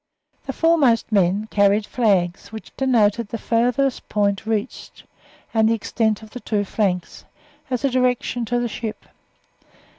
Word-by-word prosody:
The 270 - -3
foremost 280 -9 +2
men 200 +1 +2
carried 205 +1 +3
flags, 195 -7 0
which 220 -1 -10
denoted 235 -4 +2
the 230 - -5
farthest 245 +4 0
point 200 0 0
reached 220 +2 -4 0.5
and 220 -1 +3
the 230 - +3
extent 220 0 -1
of 215 - -13
the 250 - -7
two 210 -4 -1
flanks, 185 -4 -2 0.5
as 255 +1 -1
a - - +3
direction 250 -1 0
to 245 +2 0
the 240 - -1
ship. 225 -1 -6
225 Hz, 145 wpm, -21 LUFS, 205-245 Hz, 0.5 s, carried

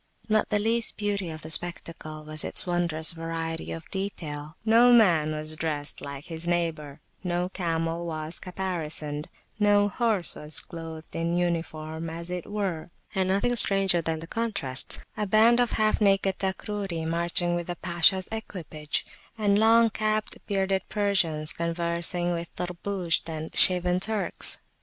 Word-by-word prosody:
Not 215 -1 +1
the 210 - +1
least 225 +2 0
beauty 205 -4 -2
of 155 0 -8
the 155 - -6
spectacle 165 -2 +1
was 155 0 +3
its - - +2
wondrous 175 -3 0
variety 165 -1 -5
of 165 -1 -7
detail: 155 -6 -5
no 230 +2 +6
man 175 -10 +4
was 155 0 -3
dressed 150 -2 -3
like 140 0 -7
his 165 0 -4
neighbour, 160 -4 -2 0.2
no 180 0 -1
camel 165 -2 -2
was 155 0 -3
caparisoned, 160 -5 -4 0.3
no 205 -1 +4
horse 215 -5 -1
was 150 +1 -4
[p.66] - - -17
clothed 165 -2 -9
in 170 +1 -1
uniform, 165 -2 -3
as 170 +2 -5
it 180 -1 -5
were. 190 -7 -3 0.2
And 190 -1 0
nothing 200 +6 +1
stranger 195 -5 +5
than 160 0 -2
the 160 - -8
contrasts; 200 - -3 0.2
a 210 - -2
band 225 +4 +5
of 245 -1 +1
half 215 0 +1
naked 195 -1 +2
Takruri 190 -3 -3
marching 170 +1 +2
with 175 -1 -3
the 175 - -4
Pashas 175 +2 +2
equipage, 165 -9 -5 0.3
and 205 -2 +2
long 225 +1 +5
capped, 215 +1 -2
bearded 195 -1 0
Persians 180 -7 0
conversing 170 +1 -1
with 170 0 -4
Tarbushd 180 -1 -3
and 160 0 -6
shaven 180 0 +9
Turks. 215 +1 -1
175 Hz, 150 wpm, -26 LUFS, 160-200 Hz, 0.3 s, shaven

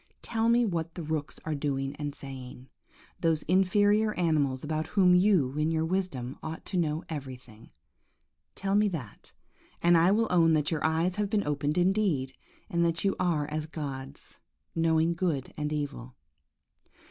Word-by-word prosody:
Tell 225 0 0
me 240 +1 +4
what 170 -4 -3
the 175 - -5
rooks 155 -1 -3
are 160 - -1
doing 140 -1 -2
and 145 -1 -4
saying; 130 -1 -9 0.5
those 165 -2 +1
inferior 205 +4 +3
animals 150 -7 +1
about 155 +1 -2
whom 185 -3 +4
you, 180 -8 +3
in 155 +1 +2
your 160 0 0
wisdom, 160 -9 -3
ought 160 +1 -6
to 190 - -3
know 160 -1 0
everything. 125 -7 -8 0.9
Tell 195 0 -2
me 210 +1 +4
that, 140 - -7 0.5
and 175 0 +4
I 170 +2 +5
will 220 +3 +3
own 165 -2 +4
that 150 0 +1
your 160 -2 -1
eyes 165 +4 +1
have 210 -1 0
been 210 -1 0
opened 145 +1 -1
indeed, 180 -8 +1 0.3
and 170 0 0
that 165 0 0
you 195 - +2
are 165 -5 +1
as 155 0 -3
gods, 140 -3 -7 0.3
knowing 165 0 +2
good 165 -7 -2
and 150 0 -3
evil. 140 - -4
160 Hz, 160 wpm, -29 LUFS, 145-180 Hz, 0.9 s, I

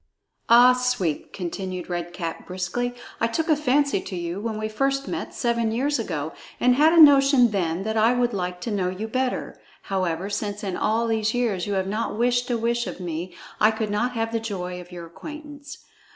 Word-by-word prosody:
"Ah, 245 +2 +8
Sweep!" 250 -11 -1
continued 185 0 -5
Red 175 -1 -4
Cap 170 -2 -5
briskly, 190 +7 -3 0.2
"I 230 - +2
took 320 +8 -2
a 310 - +6
fancy 280 -5 +2
to 185 - -7
you 175 +1 -4
when 220 -1 -3
we 215 0 -2
first 275 +5 -1
met, - - -4
seven 235 -2 0
years 270 +4 0
ago, 160 -8 -3 0.3
and 250 0 +4
had 300 +5 +5
a 335 - +5
notion 275 -5 +7
then 180 -2 -1
that 220 +1 -2
I 220 +2 +5
would 245 -1 +1
like 180 -2 -3
to 230 - -3
know 190 -3 0
you 190 +4 -4
better. 255 +2 -2 0.2
However, 185 -2 -1
since 205 0 -3
in 190 -3 -2
all 225 +2 +1
these 220 0 0
years 215 -7 0
you 205 - -1
have 190 -1 0
not 210 +2 -2
wished 245 +1 +1
a 240 - +1
wish 235 +1 0
of - - -6
me, 175 0 -5 0.2
I 215 - +6
could 220 -1 -2
not 240 +5 0
have 225 -1 -2
the 230 - 0
joy 180 -5 -5
of 175 +1 -14
your 175 -1 -8
acquaintance. 295 - -10
220 Hz, 205 wpm, -24 LUFS, 185-245 Hz, 0.3 s, Ah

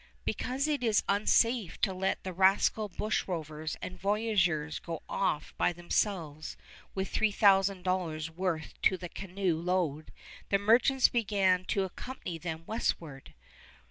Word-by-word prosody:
Because 265 +4 -1
it 295 -4 0
is 220 -3 +3
unsafe 210 0 +2
to 195 - +2
let 190 +1 -1
the 185 - -5
rascal 195 +3 +3
bushrovers 160 -6 -3
and 185 - -6
voyageurs 195 -7 +1
go 165 -2 -6
off 155 -6 -1
by - - +3
themselves 170 -3 -2 0.4
with 190 0 -3
$3000 190 -6 +2
worth 170 -2 -3
to 185 - +3
the 175 -1 -7
canoe 190 -3 -2
load, 170 -4 -1 0.4
the 200 - +4
merchants 240 +6 +4
began 195 -5 +1
to 195 - 0
accompany 185 -2 -6
them 160 -1 -5
westward. 165 - -3
190 Hz, 125 wpm, -30 LUFS, 165-205 Hz, 0.4 s, the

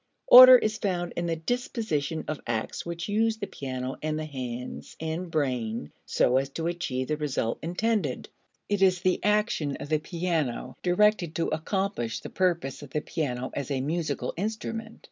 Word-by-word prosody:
Order 255 0 +12
is 215 -2 -1
found 175 -3 -2
in 170 0 -2
the 165 - 0
disposition 165 - -2
of 155 - -4
acts 115 +7 -3
which 170 0 -4
use 220 +2 +1
the 205 - -3
piano 130 -5 -5
and 155 0 -1
the 155 - -3
hands 125 -4 -6
and 160 +3 -3
brain 125 - -2 0.2
so 125 - +3
as 135 +1 0
to 160 +4 -5
achieve 170 -7 -2
the 155 - -1
result 140 -6 -1
intended. 210 +6 -1 0.4
It 205 -1 0
is 185 -2 +4
the 185 -1 +1
action 210 -9 +1
of 145 - -8
the 155 -1 +2
piano 165 -5 -2
directed 180 -2 +2
to 165 - 0
accomplish 175 - -2
the - - -9
purpose 170 -8 0
of 145 - -10
the 150 +2 -2
piano 130 -6 -3
as 140 -3 -4
a 135 -2 -1
musical 160 +4 -2
instrument. 220 +3 -4
165 Hz, 170 wpm, -27 LUFS, 140-195 Hz, 0.4 s, Order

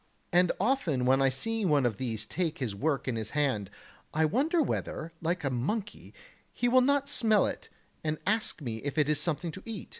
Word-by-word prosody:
And 180 0 +5
often 185 - +1
when 135 +1 +4
I 135 - +5
see 225 +13 -2
one 150 -7 +3
of 110 -5 0
these 110 -3 -3
take 165 +4 -2
this 120 -6 -3
work 140 +8 -1
in 125 - 0
his 110 -1 -3
hand, 130 -10 +1 0.5
I 160 0 +4
wonder 290 - +1
whether, 165 - -2
like 170 +1 -1
a 135 - 0
monkey, 195 - -3 0.4
he 245 - 0
will 255 +1 +5
not 280 +2 +2
smell 220 -7 +3
it - - -5 0.3
and 155 0 -1
ask 215 -5 0
me 115 -4 -3
if 140 +6 -5
it 150 -2 +3
is 150 - +2
something 170 0 -1
to 185 - -9
eat. 225 -4 -7
160 Hz, 205 wpm, -29 LUFS, 130-215 Hz, 0.5 s, And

